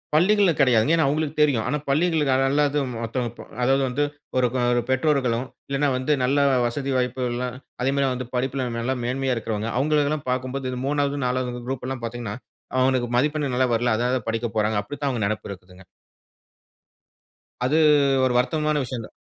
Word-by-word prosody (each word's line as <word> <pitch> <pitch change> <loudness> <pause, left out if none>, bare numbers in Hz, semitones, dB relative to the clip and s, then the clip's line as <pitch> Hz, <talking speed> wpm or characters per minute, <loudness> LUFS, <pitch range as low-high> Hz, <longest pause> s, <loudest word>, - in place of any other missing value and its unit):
பள்ளிகள்ல 195 +3 +4
கிடையாதுங்க. 130 +2 +4
ஏன்னா 160 -3 +3
அவங்களுக்கு 155 +1 -1
தெரியும். 140 -7 +3
ஆனா 150 - 0
பள்ளிகளுக்கு 150 -1 +2 0.2
அல்லது 145 +1 +2 0.2
மத்தவங்க 115 0 -2
ப - - -6 0.2
அதாவது 135 +2 +3
வந்து 135 +4 0 0.3
ஒரு 125 - +4 0.3
ஒரு 120 - +2
பெற்றோர்களும் 130 -3 +1 0.2
இல்ல 140 +1 +2
வந்து 130 +4 -1
நல்ல 135 +3 +2 0.3
வசதி 135 +3 -3
வாய்ப்புகள்லாம் 125 0 -2 0.3
அதே 130 - +2
மாரி 140 -1 +2
வந்து 125 -1 -5
படிப்பில 130 0 -1
நல்ல 125 +3 -1
மேன்மையா 130 +1 -1
இருக்கிறவங்க, 110 -1 -3
அவங்களை 150 +2 +2
எல்லாம் 150 -2 -3
பார்க்கும்போது, 130 +1 -2
இது 125 - -4
3வது 145 0 0
4வது 125 -1 -2
குரூப் 130 -1 -4
எல்லாம் 130 -3 -5
பார்த்தீங்கன்னா 115 -3 -4 0.4
அவங்களுக்கு 130 -1 +2
மதிப்பெண் 145 0 0
நல்லா 130 0 +3
வரல. 120 +1 +1
அதனால 125 +1 0
படிக்கப் 115 0 -2
போறாங்க 110 0 +1
அப்படின்னு 145 +8 -9
தான் 140 - +2
அவங்க 120 -6 -1
நினப்பு 110 +1 -3
இருக்குங்க. 90 -1 -11 1.8
அது 135 +4 +1 0.5
ஒரு 130 - +1
வருத்தமான 150 +3 +1
விஷயம் 125 -3 -5
தான். - - -15
130 Hz, 165 wpm, -24 LUFS, 120-145 Hz, 1.8 s, பள்ளிகள்ல